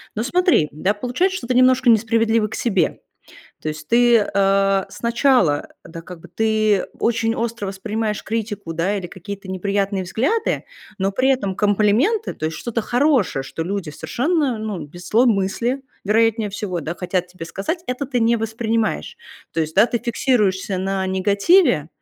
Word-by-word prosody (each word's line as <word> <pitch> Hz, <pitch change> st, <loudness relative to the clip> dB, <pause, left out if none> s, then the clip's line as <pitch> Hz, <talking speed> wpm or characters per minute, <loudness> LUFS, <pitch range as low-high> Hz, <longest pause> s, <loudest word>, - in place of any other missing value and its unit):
Но 215 Hz, -, -1 dB
смотри, 350 Hz, -, +3 dB
да, 185 Hz, +7 st, 0 dB
получается, 255 Hz, -, -1 dB
что 240 Hz, -, -7 dB
ты 255 Hz, -, +1 dB
немножко 255 Hz, 0 st, +4 dB
несправедлива 225 Hz, 0 st, +3 dB
к -, -, -6 dB
себе. 195 Hz, -8 st, 0 dB, 0.6 s
То -, -, -3 dB
есть 155 Hz, 0 st, -6 dB
ты, 240 Hz, 0 st, +5 dB
э, 195 Hz, -1 st, +2 dB
сначала, 235 Hz, -, +1 dB, 0.2 s
да, 165 Hz, 0 st, -9 dB
как 175 Hz, 0 st, -11 dB
бы -, -, -14 dB
ты 215 Hz, -2 st, +1 dB
очень 225 Hz, -1 st, +1 dB
остро 230 Hz, -3 st, -3 dB
воспринимаешь 210 Hz, +2 st, -3 dB
критику, 210 Hz, -6 st, -4 dB
да, 180 Hz, +5 st, 0 dB
или 190 Hz, -3 st, -4 dB
какие-то 195 Hz, +2 st, -9 dB
неприятные 195 Hz, +1 st, -1 dB
взгляды, 270 Hz, -, -1 dB, 0.3 s
но 195 Hz, 0 st, +1 dB
при 255 Hz, +6 st, +2 dB
этом 200 Hz, -8 st, 0 dB
комплименты, 215 Hz, -, +2 dB
то -, -, -7 dB
есть 160 Hz, 0 st, -4 dB
что-то 235 Hz, -1 st, -2 dB
хорошее, 245 Hz, -, +1 dB
что 150 Hz, +4 st, -5 dB
люди 190 Hz, 0 st, -3 dB
совершенно, 275 Hz, -, -1 dB
ну, 215 Hz, -3 st, -4 dB
без 175 Hz, +4 st, -11 dB
злой 235 Hz, +6 st, +4 dB
мысли, 235 Hz, +5 st, 0 dB, 0.2 s
вероятнее 220 Hz, +1 st, +2 dB
всего, 195 Hz, -3 st, -4 dB
да, 160 Hz, +2 st, -4 dB
хотят 180 Hz, 0 st, -2 dB
тебе 180 Hz, -2 st, -9 dB
сказать, 200 Hz, -, -4 dB
это 250 Hz, +3 st, -3 dB
ты 250 Hz, -2 st, -1 dB
не 230 Hz, +1 st, +3 dB
воспринимаешь. 225 Hz, -, -2 dB, 0.4 s
То 165 Hz, -, -1 dB
есть, 155 Hz, 0 st, -3 dB
да, 210 Hz, +4 st, +6 dB
ты 240 Hz, -, -1 dB
фиксируешься 215 Hz, -5 st, 0 dB
на 190 Hz, 0 st, -1 dB
негативе, 200 Hz, -, +3 dB
210 Hz, 165 wpm, -21 LUFS, 190-235 Hz, 0.6 s, да